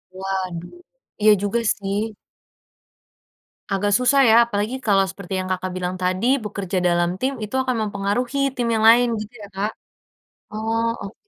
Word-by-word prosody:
Waduh. 190 - -5 0.4
Iya 215 0 +7
juga 205 +3 0 0.2
sih. 205 +2 -3 1.6
Agak 205 +1 +1
susah 255 +2 +3
ya, - - +6
apalagi 215 +2 -2
kalau 195 -1 +4
seperti 195 -1 -8
yang 185 - -4
Kakak 185 0 -2
bilang 180 0 -3
tadi, 185 +4 0 0.2
bekerja 200 -3 -4
dalam 175 0 +2
tim, 265 +2 0
itu 210 - -5
akan 255 -1 -1
mempengaruhi 210 +6 -1 0.2
tim 240 -2 -1
yang 220 - 0
lain, 240 +1 +6
gitu 215 +2 -8
ya 205 - -8
Kak. 205 +3 -1 0.8
Oh, 225 +1 -1 0.2
ok 200 +1 -7
205 Hz, 150 wpm, -22 LUFS, 190-225 Hz, 1.6 s, Iya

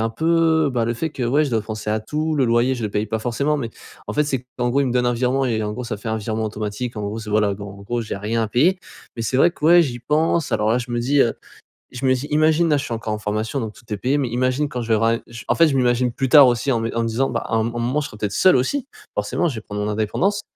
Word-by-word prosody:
un 115 0 0
peu 160 +3 +2
bah, 120 -2 +1
le 115 +1 -1
fait 160 +7 -3
que, 135 - -6
ouais 140 +6 +2
je 145 - -3
dois 115 -2 0
penser 110 0 -6
à 110 +1 0
tout, 155 +8 -2
le 140 -3 +2
loyer 120 +2 +2
je 120 - -6
le 105 - -2
paye 105 +2 -1
pas 110 +1 -2
forcément 140 +6 0
mais, 120 -6 -4 0.4
en - - -2
fait 150 - +2
c'est 135 -4 -2
qu'en 120 0 +1
gros, 140 +3 +2
ils 140 - +1
me - - -2
donnent 125 0 +1
un 120 - +2
virement, 130 +3 +1
et 115 -4 0
en 105 0 -2
gros, 125 +4 -5
ça 110 -2 -4
fait 105 +3 -7
un 110 - 0
virement 110 +1 -3
automatique, 110 +3 -4
en 105 - -4
gros 105 +2 -4
c'est 105 -1 -7
voilà, 105 -1 +2
donc 100 +1 -8
en - - -12
gros 120 +3 -2
j'ai 110 - -5
rien 110 +3 -1
à 110 - -2
payer. 165 - +3 0.4
Mais 115 - -3
c'est 120 +3 -1
vrai 165 +6 +5
que - - -9
ouais, 175 +2 +7
j'y 125 -6 -4
pense 155 +4 +1
alors 105 0 +1
là, 120 - +2
je 120 0 -6
me 120 - -1
dis 140 +4 +2
heu, 115 - +3 0.6
je 130 +2 -5
me 130 - +5
dis 130 +3 -4
imagine 155 +2 +3
là 150 - +3
je 140 - -3
suis 120 - -4
encore 110 -1 -3
en 105 - -3
formation, 110 +5 -2
donc 110 -3 -4
tout - - -18
est - - -2
payé 130 +7 0
mais 140 -3 0
imagine 130 +4 0
quand 125 -3 -4
je 115 - -6
vais 110 - +4
ram 115 +1 +2
je 115 0 -10
en - - +3
fait, 165 - +5
je 145 - 0
m'imagine 125 -1 +2
plus 135 +3 -2
tard 145 -1 +9
aussi 125 +3 +1
en 120 - +1
me 115 0 -3
en 115 - +1
me - - -1
disant: 120 +4 0
«Bah 115 - -2
à - - -5
un 110 - +2
mom 115 +1 -3
à - - -3
un - - -2
moment, 130 +6 0
je 145 - -4
serai 105 - -12
peut-être 105 -1 -2
seul 185 - +4
aus.si, 240 - 0 0.3
forcément. 175 - 0
Je 155 - -2
vais 110 - -6
prendre 105 -1 -6
mon 105 - -1
indépendance.». 170 - 0
120 Hz, 330 wpm, -21 LUFS, 110-140 Hz, 0.6 s, tard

